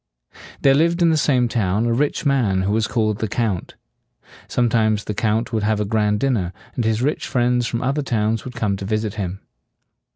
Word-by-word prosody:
There 135 Hz, -, +6 dB
lived 170 Hz, +4 st, +2 dB
in 165 Hz, -, +5 dB
the -, -, +3 dB
same 130 Hz, -5 st, +2 dB
town 105 Hz, -2 st, 0 dB
a 120 Hz, -, +1 dB
rich 145 Hz, +5 st, 0 dB
man 115 Hz, -10 st, +2 dB
who 100 Hz, -, 0 dB
was 110 Hz, 0 st, +1 dB
called 110 Hz, -3 st, 0 dB
the 110 Hz, -, -1 dB
Count. 105 Hz, -5 st, -2 dB, 0.7 s
Sometimes 110 Hz, -3 st, +1 dB
the 105 Hz, -, -4 dB
Count 110 Hz, +3 st, -1 dB
would 110 Hz, -, +1 dB
have 105 Hz, 0 st, +1 dB
a 105 Hz, -, 0 dB
grand 105 Hz, -1 st, +1 dB
dinner, 110 Hz, -10 st, 0 dB, 0.2 s
and 120 Hz, -, -2 dB
his 110 Hz, +2 st, +1 dB
rich 150 Hz, +3 st, -1 dB
friends 125 Hz, -1 st, +1 dB
from 115 Hz, +1 st, -3 dB
other 140 Hz, +3 st, 0 dB
towns 110 Hz, -4 st, -1 dB
would 125 Hz, 0 st, -8 dB
come 105 Hz, -6 st, 0 dB
to 100 Hz, -, -6 dB
visit 110 Hz, 0 st, -1 dB
him. 95 Hz, -2 st, -4 dB
110 Hz, 200 wpm, -21 LUFS, 105-125 Hz, 0.7 s, There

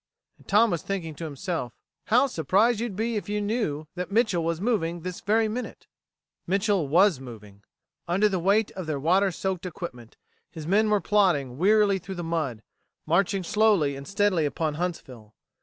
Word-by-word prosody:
And -, -, -22 dB
Tom 210 Hz, +2 st, +4 dB
was 170 Hz, -3 st, -1 dB
thinking 180 Hz, -5 st, -4 dB
to 165 Hz, +3 st, -7 dB
himself: 150 Hz, -4 st, -4 dB, 0.3 s
"How 240 Hz, +5 st, +4 dB
surprised 210 Hz, -, +2 dB
you'd 230 Hz, -4 st, -3 dB
be 225 Hz, +2 st, -1 dB
if 205 Hz, -, -5 dB
you 210 Hz, 0 st, -1 dB
knew 205 Hz, -9 st, -2 dB
that 180 Hz, 0 st, -5 dB
Mitchel 205 Hz, -6 st, +2 dB
was 165 Hz, 0 st, -1 dB
moving 175 Hz, -6 st, -1 dB
this 180 Hz, +1 st, -6 dB
very 220 Hz, +2 st, +2 dB
minute." 240 Hz, +4 st, -6 dB, 0.6 s
Mitchel 195 Hz, -3 st, +1 dB
was 175 Hz, +1 st, +4 dB
moving. 105 Hz, -6 st, -12 dB, 0.5 s
Under 190 Hz, +5 st, +3 dB
the 190 Hz, -3 st, -1 dB
weight 200 Hz, +5 st, +2 dB
of 185 Hz, -4 st, -7 dB
their 150 Hz, -3 st, -2 dB
water 185 Hz, +6 st, +2 dB
soaked 185 Hz, 0 st, -3 dB
equipment, 125 Hz, -10 st, -8 dB, 0.3 s
his 160 Hz, -2 st, -9 dB
men 210 Hz, +6 st, +2 dB
were 210 Hz, -1 st, +2 dB
plodding 160 Hz, -11 st, +1 dB
wearily 205 Hz, +1 st, +4 dB
through 190 Hz, +2 st, -8 dB
the 175 Hz, -, -5 dB
mud, 155 Hz, -9 st, -3 dB, 0.4 s
marching 195 Hz, +3 st, +1 dB
slowly 195 Hz, -8 st, +2 dB
and 140 Hz, 0 st, -9 dB
steadily 200 Hz, -5 st, +1 dB
upon 155 Hz, +2 st, -2 dB
Huntsville. 130 Hz, -10 st, -6 dB
180 Hz, 175 wpm, -26 LUFS, 155-205 Hz, 0.6 s, Tom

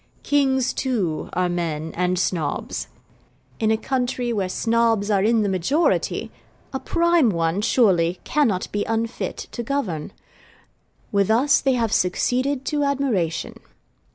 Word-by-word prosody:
Kings, 265 Hz, -3 st, +2 dB
too, 205 Hz, -, -2 dB
are 180 Hz, 0 st, +1 dB
men 165 Hz, -3 st, -3 dB
and 180 Hz, +1 st, 0 dB
Snobs. 165 Hz, -5 st, -2 dB, 0.7 s
In 220 Hz, -, +1 dB
a 220 Hz, -, +3 dB
country 250 Hz, -1 st, -1 dB
where 195 Hz, -4 st, -1 dB
Snobs 225 Hz, -1 st, +1 dB
are 200 Hz, -2 st, +3 dB
in 225 Hz, 0 st, +3 dB
the -, -, 0 dB
majority, 200 Hz, -, 0 dB, 0.4 s
a 265 Hz, -, -2 dB
prime 340 Hz, -5 st, +2 dB
one, 170 Hz, 0 st, 0 dB
surely, 180 Hz, -7 st, +3 dB
cannot 240 Hz, -11 st, +1 dB
be 205 Hz, 0 st, -1 dB
unfit 225 Hz, +1 st, -2 dB
to 240 Hz, -, -4 dB
govern. 225 Hz, -, -3 dB, 1.0 s
With 200 Hz, -1 st, +2 dB
us 265 Hz, +6 st, +4 dB
they 270 Hz, -1 st, +2 dB
have 230 Hz, -3 st, 0 dB
succeeded 255 Hz, +9 st, 0 dB
to 295 Hz, -2 st, 0 dB
admiration. 240 Hz, -, -1 dB
225 Hz, 130 wpm, -22 LUFS, 180-265 Hz, 1.0 s, us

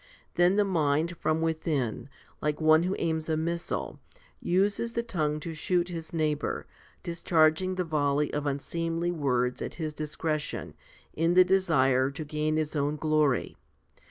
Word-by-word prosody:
Then 175 Hz, +2 st, +4 dB
the 205 Hz, 0 st, +3 dB
mind 165 Hz, -2 st, +1 dB
from 155 Hz, 0 st, 0 dB
within, 150 Hz, -7 st, -1 dB, 0.3 s
like 150 Hz, 0 st, -1 dB
one 155 Hz, 0 st, +5 dB
who 185 Hz, +3 st, -1 dB
aims 160 Hz, -1 st, -1 dB
a 155 Hz, -, +1 dB
missile, 170 Hz, +2 st, -3 dB, 0.4 s
uses 200 Hz, +6 st, 0 dB
the 235 Hz, -, -1 dB
tongue 155 Hz, -9 st, -1 dB
to 165 Hz, +2 st, -5 dB
shoot 175 Hz, +2 st, 0 dB
his 165 Hz, -2 st, -6 dB
neighbour, 155 Hz, -3 st, -1 dB, 0.4 s
discharging 170 Hz, +1 st, +2 dB
the 185 Hz, -, 0 dB
volley 150 Hz, -2 st, 0 dB
of 150 Hz, 0 st, -2 dB
unseemly 165 Hz, +4 st, -2 dB
words 125 Hz, -6 st, 0 dB
at -, -, -5 dB
his 155 Hz, -3 st, -4 dB
discretion, 155 Hz, 0 st, -3 dB, 0.2 s
' -, -, -27 dB
in 165 Hz, +2 st, +1 dB
the 185 Hz, 0 st, +8 dB
desire 135 Hz, -9 st, +3 dB
to 150 Hz, +3 st, -6 dB
gain 155 Hz, +1 st, -1 dB
his 155 Hz, 0 st, -2 dB
own 145 Hz, +1 st, 0 dB
glory. 150 Hz, -4 st, +1 dB
155 Hz, 155 wpm, -28 LUFS, 150-170 Hz, 0.4 s, the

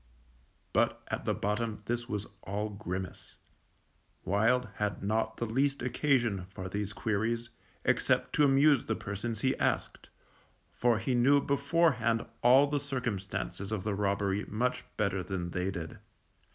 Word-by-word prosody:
But -, -, +2 dB
at -, -, -3 dB
the -, -, +1 dB
bottom 105 Hz, +1 st, -2 dB
this 120 Hz, +3 st, -2 dB
was 105 Hz, -2 st, -2 dB, 0.2 s
all 105 Hz, +2 st, -3 dB
grimace. 95 Hz, -2 st, -6 dB, 0.9 s
Wild 115 Hz, +5 st, +2 dB
had 105 Hz, -2 st, -2 dB
not 110 Hz, +2 st, 0 dB
the 120 Hz, -, -1 dB
least 135 Hz, +5 st, 0 dB
occasion 120 Hz, -10 st, +1 dB
for 95 Hz, -1 st, -6 dB
these 105 Hz, +1 st, -3 dB
queries, 115 Hz, +2 st, -1 dB, 0.3 s
except -, -, +2 dB
to 150 Hz, -, +4 dB
amuse 140 Hz, 0 st, +5 dB
the 110 Hz, -, 0 dB
persons 105 Hz, +3 st, -4 dB
he 130 Hz, 0 st, +2 dB
asked, -, -, -1 dB, 0.6 s
for 120 Hz, -2 st, +2 dB
he 115 Hz, +4 st, -1 dB
knew 130 Hz, +4 st, +5 dB
beforehand 140 Hz, -5 st, +2 dB, 0.2 s
all 130 Hz, +4 st, +7 dB
the 145 Hz, 0 st, 0 dB
circumstances 110 Hz, -7 st, -3 dB
of 105 Hz, -4 st, -2 dB
the 105 Hz, -, -1 dB
robbery 100 Hz, 0 st, 0 dB
much 125 Hz, +4 st, -1 dB
better 100 Hz, -2 st, +1 dB
than 90 Hz, -2 st, -4 dB
they 90 Hz, +2 st, -1 dB
did. 85 Hz, -4 st, -6 dB
110 Hz, 140 wpm, -31 LUFS, 100-125 Hz, 0.9 s, all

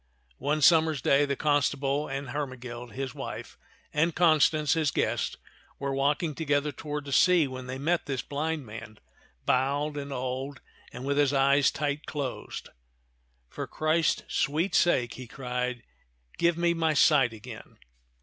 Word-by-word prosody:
One 150 Hz, +1 st, 0 dB
summer's 160 Hz, -2 st, +5 dB
day 140 Hz, +2 st, +3 dB
the 140 Hz, -1 st, -1 dB
constable 145 Hz, 0 st, +1 dB
and 135 Hz, 0 st, -4 dB
Hermegild, 125 Hz, -4 st, -5 dB
his 135 Hz, -1 st, -4 dB
wife, -, -, -7 dB, 0.4 s
and 160 Hz, +2 st, +1 dB
Constance, 155 Hz, -3 st, +4 dB
his 160 Hz, -3 st, +1 dB
guest, -, -, -1 dB, 0.4 s
were 140 Hz, 0 st, -2 dB
walking 145 Hz, +4 st, +1 dB
together 145 Hz, -1 st, 0 dB
toward 150 Hz, +1 st, -5 dB
the 140 Hz, -, -7 dB
sea, 175 Hz, +1 st, +5 dB
when 130 Hz, -1 st, -7 dB
they 130 Hz, +1 st, -4 dB
met 165 Hz, +5 st, 0 dB
this 135 Hz, -3 st, -2 dB
blind 150 Hz, 0 st, -3 dB
man, 110 Hz, 0 st, -9 dB, 0.5 s
bowed 140 Hz, +3 st, +1 dB
and 140 Hz, 0 st, -5 dB
old 130 Hz, +1 st, -4 dB, 0.3 s
and 125 Hz, -, -7 dB
with 140 Hz, +1 st, +1 dB
his 145 Hz, -1 st, +3 dB
eyes 140 Hz, 0 st, +4 dB
tight 145 Hz, 0 st, -3 dB
closed. 140 Hz, -4 st, -5 dB, 0.8 s
For -, -, -6 dB
Christ's 155 Hz, +1 st, +1 dB
sweet 160 Hz, +6 st, 0 dB
sake," 130 Hz, -10 st, +3 dB
he 125 Hz, -1 st, -9 dB
cried, 125 Hz, -1 st, -3 dB, 0.6 s
"give 170 Hz, -1 st, +3 dB
me 170 Hz, 0 st, +2 dB
my 160 Hz, -2 st, +1 dB
sight 140 Hz, -4 st, +5 dB
again 110 Hz, -2 st, -11 dB
140 Hz, 150 wpm, -28 LUFS, 130-155 Hz, 0.8 s, summer's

